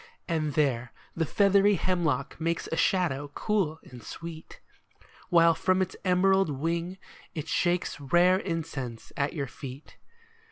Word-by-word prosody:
And 155 -3 -1
there 125 -5 +1 0.2
the 165 -2 0
feathery 200 +2 +4
hemlock 160 -8 -1
makes 165 +1 -1
A - - 0
shadow 165 -5 +1
cool 190 -8 0
and 125 -2 -12
sweet, 165 +3 -9 0.7
While 170 -2 +6
from 185 +3 +1
its 190 -1 -1
emerald 190 0 +3
wing 165 +6 -2 0.4
it 155 -1 -4
shakes 175 -2 0
Rare 175 +6 +4
incense 155 - -5
at 140 0 -1
your 145 -4 -2
feet. 135 +2 -10
165 Hz, 130 wpm, -28 LUFS, 145-185 Hz, 0.7 s, While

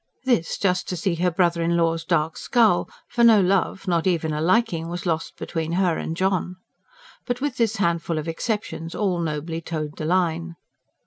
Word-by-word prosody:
this, 240 -11 +1
just 180 -2 0
to 180 - -2
see 170 +2 0
her 175 +2 +1
brother 170 -1 +1
in 170 +1 +1
law's 165 -1 +1
dark 165 -2 0
scowl; 220 -7 +2 0.2
for 240 -1 0
no 225 -3 +7
love 190 +1 +1
not 170 -1 +1
even 160 -4 +1
a 150 - -2
liking 180 -2 +1
was 175 +1 -5
lost 165 -2 -2
between 165 0 -3
her 180 -2 +2
and 165 - -4
John. 185 -1 0 0.7
But 245 -1 -1
with 275 -2 -2
this 225 -2 +1
handful 170 -4 0
of 155 +1 -3
exceptions 165 -2 -3
all 190 -4 0
nobly 160 0 -3
toed 155 -2 -5
the 155 - -4
line. 170 -1 0
170 Hz, 185 wpm, -23 LUFS, 165-195 Hz, 0.7 s, no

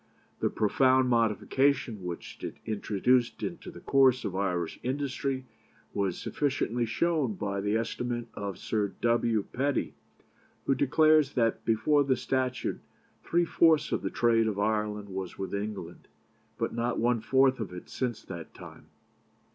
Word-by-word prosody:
The - - +1
profound 130 +4 +3
modification 115 0 +1
which 90 -1 -7
it - - -4
introduced 115 +3 +1
into 175 - -5
the - - -11
course 130 -3 +4
of 95 -2 -3
Irish 90 -4 -1
industry 135 0 -2 0.5
was 100 -3 -1
sufficiently 125 -5 -1
shown 150 -3 0
by 100 0 -3
the 105 +2 0
estimate 120 +1 -3
of 100 -3 -5
Sir 105 -3 -1
W. 115 -2 +2
Petty, 140 +2 0 0.7
who - - +3
declares 150 +2 +4
that 115 -3 +1
before 115 +7 +3
the 130 -2 +1
statute 130 0 -1 0.4
three 175 +1 +2
fourths 160 -2 +3
of - - 0
the - - -2
trade 115 -1 +2
of 105 -2 -2
Ireland 105 -1 -1
was 95 -1 -5
with 95 0 -5
England, 100 -4 -5 0.5
but - - -2
not 120 +1 -1
one 120 0 +2
fourth 130 +2 +3
of 110 -5 -4
it 90 0 -9
since 120 -4 -3
that 85 -4 -9
time. - - -12
120 Hz, 145 wpm, -29 LUFS, 105-130 Hz, 0.7 s, course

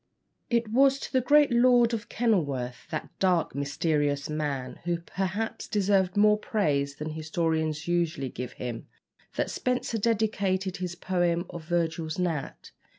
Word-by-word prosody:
It 235 -1 +1
was 270 +4 +4
to - - -8
the 260 - +4
great 295 +2 +5
Lord 240 -1 +5
of 230 +1 -4
Kenilworth 140 - -1
that 155 - -4
dark, 180 -4 +2
mysterious 145 0 0
man, 140 -5 -3
who 175 -1 +1
perhaps 195 +5 -3
deserved 195 -2 +1
more 210 0 +5
praise 140 -11 0
than 155 +1 -5
historians 160 -1 -1
usually 170 -6 0
give 125 0 -6
him 120 -2 -6 0.5
that - - -1
Spenser 250 -2 -1
dedicated 200 -4 0
his 180 -1 -4
poem 175 -1 0
of 170 -2 -8
"Virgil's 165 -2 -1
Gnat." 170 -6 -3
175 Hz, 140 wpm, -27 LUFS, 150-215 Hz, 0.5 s, great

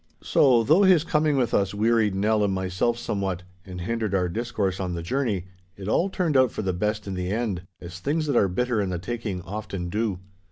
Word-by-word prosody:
So, 125 -5 +4
though 155 - +5
his 185 -5 +5
coming 150 -3 +1
with 125 -3 +1
us 100 0 +1
wearied 110 -1 +2
Nell 105 +2 +2
and 100 - +1
myself 95 +5 0
somewhat 95 -5 -3 0.2
and 90 -1 -7
hindered 110 +1 -1
our 90 -2 +2
discourse 105 -2 -2
on 90 -2 -2
the 85 - -4
journey, 105 -3 -1 0.3
it 100 -1 -7
all 175 - +2
turned 175 -6 -1
out 130 -1 +5
for - - -4
the 95 -1 0
best 105 +3 -1
in 100 - -4
the 90 -1 -3
end, 100 -4 -2
as 90 +1 -9
things 155 - -1
that 145 -4 0
are 100 - +4
bitter 120 +4 0
in 100 - -1
the 90 - -2
taking 100 -1 -4
often 95 -2 -5
do. 105 0 -1
105 Hz, 215 wpm, -25 LUFS, 95-120 Hz, 0.3 s, though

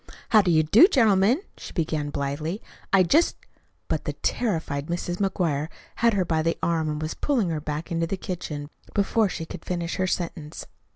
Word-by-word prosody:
"How 215 -3 +7
do 190 - 0
you 160 -2 +4
do, 220 - +7
gentlemen," 225 - +3
she - - -9
began 155 -3 -1
blithely. 145 +6 -3 0.3
"I 195 -1 +6
just 305 - +3 0.3
" - - -42
But - - -2
the - - -2
terrified 160 -10 -2
Mrs. 175 +1 -3
McGuire 170 -7 0 0.3
had 230 -1 +3
her 190 -2 +1
by 160 -2 +1
the 165 +1 0
arm 160 -2 +1
and 150 0 -2
was 155 +1 -3
pulling 245 -11 0
her 155 -2 -2
back 150 +2 -5
into 165 0 0
the 195 - -2
kitchen 150 -6 -5 0.2
before 205 +1 +2
she 165 - -5
could - - -9
finish 175 -1 -3
her 185 - +1
sentence. 165 -4 -4
170 Hz, 190 wpm, -25 LUFS, 155-195 Hz, 0.3 s, How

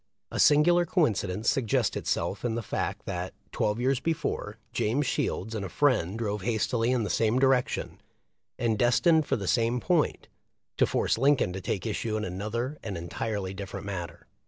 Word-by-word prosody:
A - - -3
singular 175 +4 +5
coincidence 110 - 0
suggests 120 -6 +1
itself - - -2
in 120 -2 0
the 115 - -3
fact - - -3
that, 90 +1 -4 0.2
twelve 105 +2 0
years 130 +1 +1
before, 150 -10 -2 0.2
James 130 +7 +1
Shields 110 -2 -1
and 110 -3 -3
a 95 - -4
friend 110 - +1
drove 105 -3 -2
hastily 115 +3 0
in 125 -2 +2
the 105 - -3
same 110 +4 +2
direction, 130 -1 +1 0.6
and 115 -3 0
destined 155 +6 +4
for - - +2
the 100 -4 -4
same 120 +3 +2
point, 170 +2 0 0.5
to - - +4
force - - +1
Lincoln 135 -9 +3
to 95 - -5
take 95 +1 -3
issue 110 0 -2
in 105 - -2
another 110 +9 -3
and 95 - -5
entirely 95 +3 -3
different 100 0 -7
matter. 95 -4 -6
115 Hz, 170 wpm, -28 LUFS, 100-130 Hz, 0.6 s, singular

